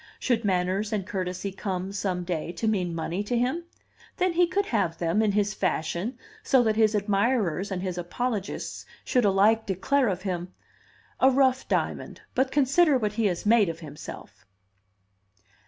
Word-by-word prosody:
Should 235 -3 0
manners 190 +2 0
and 205 -4 -1
courtesy 185 0 -3
come, 190 -1 -4
some 190 -3 -2
day, 170 -2 -3
to 220 - -2
mean 180 -6 0
money 165 +3 -2
to 240 +4 -1
him, 260 +8 0 0.5
then 365 -1 +1
he 350 +1 +4
could 395 +3 0
have 200 - 0
them, 170 +5 +1
in 210 -2 +2
his 205 0 +1
fashion, 185 +5 -2 0.2
so 260 -2 +4
that 220 -2 +1
his 220 -1 +3
admirers 200 -3 +1
and 185 -1 -3
his 180 -2 -3
apologists 205 +3 -3 0.2
should 250 -3 +2
alike 205 +3 +3
declare 250 +8 +1
of 190 -2 -2
him, 180 -2 -4 0.6
"A 265 - +6
rough 265 -1 +2
diamond, - - -2
but 260 +1 +1
consider 285 +2 +4
what 210 -4 -1
he 220 -1 +1
has 180 0 -3
made 215 -3 +5
of 165 +1 -6
himself!" 140 -8 -10
205 Hz, 165 wpm, -26 LUFS, 180-245 Hz, 0.6 s, A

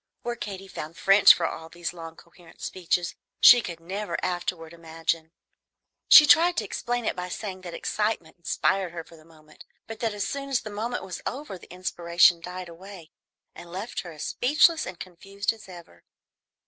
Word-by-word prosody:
Where 240 0 -3
Katy 195 -4 -7
found 165 -2 -8
French 195 0 +7
for - - +2
all 160 0 -5
these 175 +1 -5
long 165 -1 -9
coherent 170 0 -19
speeches, 175 -1 -2 0.3
she 245 - +9
could 170 -6 -7
never 185 +1 -4
afterward 175 -2 -4
imagine. 165 -1 -3 0.8
She 305 - +11
tried 345 +3 +5
to - - +1
explain 245 -1 -3
it - - -1
by 180 0 -5
saying 190 0 -6
that 175 -2 -8
excitement 210 -7 -2
inspired 185 +1 0
her 165 -1 -6
for 165 - -17
the 155 - -18
moment, 155 -2 -18 0.2
but 225 -1 -9
that 225 -3 -2
as 205 - -2
soon 275 0 -5
as 265 -3 +1
the 215 - -8
moment 230 +4 -4
was 185 -2 -7
over 275 -6 -6
the - - -16
inspiration 175 -1 +2
died 180 +1 -7
away 175 -1 -12 0.4
and 170 - -12
left 195 +6 -5
her 175 - -7
as 155 0 -8
speechless 310 +5 +3
and 185 -2 -8
confused 195 +3 -4
as 220 -3 -15
ever. 170 - -14
180 Hz, 185 wpm, -26 LUFS, 170-210 Hz, 0.8 s, She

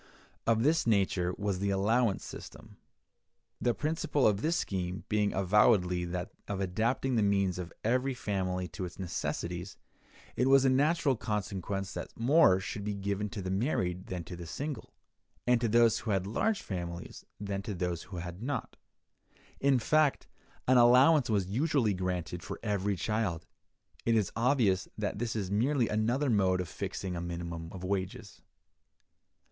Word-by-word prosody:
Of 115 0 +3
this 155 -1 +2
nature 95 -4 +2
was 100 -2 -1
the 100 +1 0
allowance 105 +3 +1
system. - - -10 0.8
The 120 -2 +2
principle 150 +1 0
of 105 -1 +3
this 165 +5 +1
scheme 90 -1 -3
being 105 -1 +2
avowedly 95 -2 +3
that 90 +1 -4 0.2
of 100 -1 -3
adapting 115 +7 0
the - - +3
means 100 -3 +1
of 90 -1 -6
every 125 +4 +1
family 95 -5 -2
to 95 - -5
its 85 - -9
necessities, 90 0 -4 0.6
it 125 - +2
was 135 0 +6
a 130 - +5
natural 145 +1 +3
consequence 100 -2 -3
that - - -7
more 125 - +5
should 100 +2 -5
be 105 0 -2
given 100 +1 -2
to 100 -1 -6
the 95 - -3
married 95 - -1
than 90 -2 -4
to 90 - -8
the 85 -1 -8
single, 145 - -5 0.5
and 125 -1 +3
to 120 - +2
those 115 0 +4
who 110 +1 -6
had 95 -2 +1
large 200 - 0
families 85 -2 -6 0.2
than 100 -1 -3
to 100 0 -5
those 90 -2 -2
who 95 - -6
had 90 +2 -6
not: 125 -1 -4 0.8
in 140 -1 +4
fact, 150 +4 +2 0.4
an 130 0 +5
allowance 125 +4 +6
was 100 -4 +2
usually 120 - +1
granted 90 -2 -3
for - - -7
every 100 -2 0
child. 95 -5 -1 0.6
It 115 - +4
is 105 -4 +1
obvious 115 -6 +2
that 105 -1 -2
this 115 -1 -2
is 100 -3 -2
merely 120 +4 +2
another 120 +6 +1
mode 95 -4 +3
of 90 - -2
fixing 90 +2 -4
a 85 - -3
minimum 85 -1 -5
of 95 -1 -8
wages. 100 +3 -4
100 Hz, 165 wpm, -31 LUFS, 90-120 Hz, 0.8 s, was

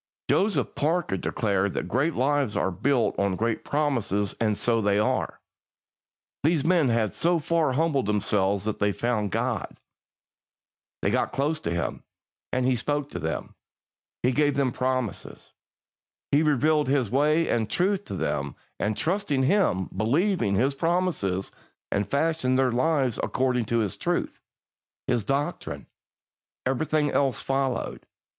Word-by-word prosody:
Joseph 190 - +1
Parker 160 - 0
declared 100 0 0
that - - -3
great 140 - 0
lives 140 -3 +1
are 95 - +1
built 125 +7 +1
on 100 -1 +1
great 115 +3 -1
promises, 120 -9 0
and 105 -2 +1
so 115 -1 +2
they 100 -1 +2
are. 105 - 0 1.0
These 155 0 +2
men 165 -6 +3
had 115 -3 +1
so 170 +2 +2
far 160 -3 +1
humbled 145 -5 +1
themselves 100 -1 +1
that 110 - -2
they 100 0 +2
found 110 -3 -1
God. - - -2 1.3
They - - +2
got - - 0
close 150 +3 0
to - - -3
Him, 85 0 -2 0.5
and 130 0 0
He 130 0 +3
spoke 145 +4 -2
to - - -4
them. - - -4 0.7
He 125 - +3
gave 145 +1 +2
them 135 -2 +1
promises. 130 -3 -3 0.8
He 145 - +4
revealed 150 0 +2
His 130 -6 +1
way 150 +5 +3
and 110 -3 0
truth 195 +2 +1
to - - -5
them, 70 -5 -2 0.2
and 105 +1 -1
trusting 170 -7 0
Him, 130 - +2
believing 130 - +1
His 130 +7 +2
promises, 165 - -1 0.4
and 100 0 0
fashioning 140 -3 +1
their 130 -1 +3
lives 130 -1 +1
according 125 -2 0
to 115 +2 0
His 105 -5 0
truth - - -2 0.7
His 120 -3 0
doctrine 140 +5 -2 0.8
everything 150 +3 +1
else 135 -2 +1
followed. 135 -2 -2
130 Hz, 140 wpm, -26 LUFS, 105-150 Hz, 1.3 s, He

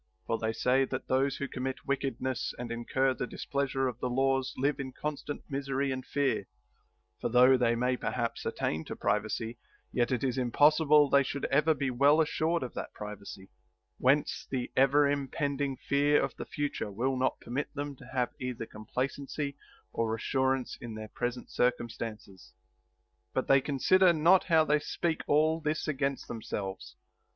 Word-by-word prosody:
For 115 - -1
they 110 0 0
say 125 +4 +2
that, - - -5
those 135 +1 +1
who 140 - -3
commit 130 0 -4
wickedness 135 -2 -2
and 120 -1 -5
incur 130 +3 +1
the 125 - -4
displeasure 135 -1 -1
of 125 -2 -5
the 125 - -1
laws 135 +1 +1
live 140 +2 +1
in 130 -2 -5
constant 150 0 -5
misery 135 0 -1
and 130 0 -3
fear, 140 +1 0 0.7
for, - - -1
though 125 +2 +6
they 120 -2 +2
may 125 +2 +1
perhaps 120 -2 -2
attain 80 +1 -2
to - - -6
privacy, 110 +3 -1 0.3
yet 120 0 +1
it 125 -1 0
is 130 -1 0
impossible 150 +4 +5
they 140 0 +5
should 140 +1 -3
ever 150 +3 +4
be 135 -2 -1
well 140 +5 +4
assured 160 +1 +1
of 125 - -6
that - - -6
privacy; 100 -2 -8 0.5
whence 140 +4 +2
the 130 -2 -3
ever 140 +2 +5
im 140 -1 0
pending 140 -1 -2
fear 145 +3 +2
of - - -2
the - - -6
future 145 -7 -3
will 125 +7 -1
not 130 0 0
permit 130 +5 -4
them 145 0 -4
to 125 - -13
have 125 -2 -1
either 125 -3 -4
complacency 135 +6 -4 0.4
or 110 -1 0
assurance 130 +2 0
in 115 -2 -6
their 110 0 -7
present 120 +2 -4
circum 120 -1 +1
stances. 110 -4 -8 0.8
But - - 0
they 135 0 +6
consider 170 +6 +4
not 170 +4 +5
how 160 -3 +4
they 150 0 +3
speak 165 +2 -2
all 155 +2 +3
this 155 0 -1
against 140 -2 -1
themselves. 100 -4 -5
135 Hz, 170 wpm, -30 LUFS, 120-145 Hz, 0.8 s, though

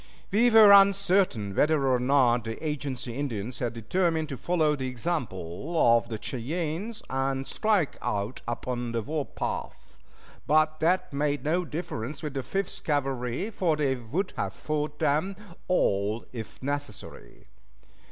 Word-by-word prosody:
We 230 +5 +4
were 220 -3 +8
uncertain 195 - +4
whether 150 +1 +3
or 130 -1 +3
not 125 -3 +3
the 115 +8 -4
agency 135 -5 -4
Indians 125 -3 -4
had 120 -3 -2
determined 160 - 0
to 140 - -4
follow 155 +1 +1
the 130 -2 -3
example 125 - -4 0.2
of 115 0 0
the 110 - -3
Cheyennes 165 - -4
and 135 0 -1
strike 210 -6 0
out 100 +4 -2
upon 120 0 -3
the 115 -1 -1
warpath; 150 +3 -4 0.5
but 155 +1 +3
that 170 0 +1
made 145 0 0
no 170 +4 +1
difference 150 -3 -5
with 150 -3 -4
the 135 - -2
Fifth 195 +8 -3
Cavalry, 135 - -1
for 175 -6 +1
they 145 -3 +1
would 130 - -3
have 95 -1 -2
fought 150 -1 -3
them 155 +9 +1 0.3
all 105 - +1
if 115 +1 -8
necessary. 145 -5 -6
145 Hz, 140 wpm, -27 LUFS, 120-165 Hz, 0.5 s, were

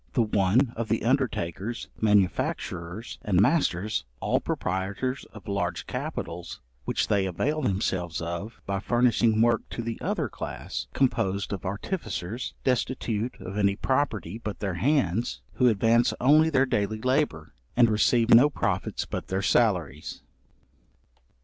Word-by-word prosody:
The - - +3
one, 105 +4 +2
of 115 -1 -3
the 115 +1 0
undertakers, 120 - -1
manufacturers 100 -1 0
and 95 -4 +2
masters, 105 - +2 0.2
all - - +1
proprietors 100 +8 -2
of 110 -4 -14
large 90 -4 -2
capitals, 85 +1 -5 0.3
which - - 0
they 100 -2 +2
avail 145 - -1
themselves 95 - -1
of, 85 +7 -5
by 100 0 -1
furnishing 115 0 +3
work 120 0 +3
to 120 - -5
the 115 0 -4
other - - -1
class, - - -5
composed 100 -7 +1
of 95 -1 -4
artificers, 110 - -4
destitute 125 -2 -1
of 95 +3 -5
any 100 -1 +3
property 110 - -1
but 105 -3 -5
their 100 -3 -2
hands, 115 - 0
who 125 - +5
advance 115 +2 +3
only 155 +5 +5
their 135 -3 +3
daily 110 -4 -1
labour, 125 - 0 0.2
and 120 -1 +7
receive 115 +2 +3
no 125 +6 +8
profits 100 -8 -2
but - - -5
their 95 +1 -1
salaries. 90 - +1
110 Hz, 135 wpm, -27 LUFS, 95-120 Hz, 0.3 s, no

